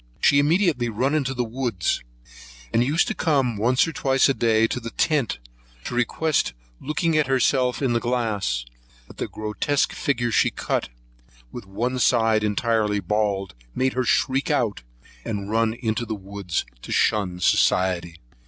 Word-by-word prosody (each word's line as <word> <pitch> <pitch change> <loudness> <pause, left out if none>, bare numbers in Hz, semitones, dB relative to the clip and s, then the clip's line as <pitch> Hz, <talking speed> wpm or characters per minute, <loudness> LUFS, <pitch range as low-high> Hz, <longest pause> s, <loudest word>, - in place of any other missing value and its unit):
She 140 - +4
immediately 150 - +2
run 125 +6 0
into 135 -4 0
the 125 - 0
woods, 115 -6 -2 0.7
and 115 - +4
used 150 +7 +2
to - - -1
come 135 - +1
once 125 +8 +2
or 165 - -5
twice 135 -2 +2
a 135 - +2
day 115 -3 +2
to 120 - -2
the 115 -1 -6
tent, 145 -2 0 0.5
to - - -5
request 125 - 0 0.3
looking 155 +3 -1
at 155 -3 +2
herself 130 0 +1
in 125 -3 +2
the 115 - +2
glass; 110 - -1 0.4
but - - -16
the - - -3
grotesque 110 +7 -1
figure 120 -4 -1
she - - +3
cut, - - -2 0.6
with - - -9
one 120 +6 -2
side 110 -3 +3
entirely 105 0 +1
bald, 100 0 -1 0.2
made 130 0 +1
her 130 - 0
shriek 135 +4 +1
out, 120 -8 0 0.4
and 100 -1 -4
run 115 0 +1
into 115 -1 -2
the 110 - -3
woods 100 -3 -4 0.2
to - - -9
shun 95 -4 +1
society. 90 -1 +2
120 Hz, 160 wpm, -23 LUFS, 105-135 Hz, 0.7 s, She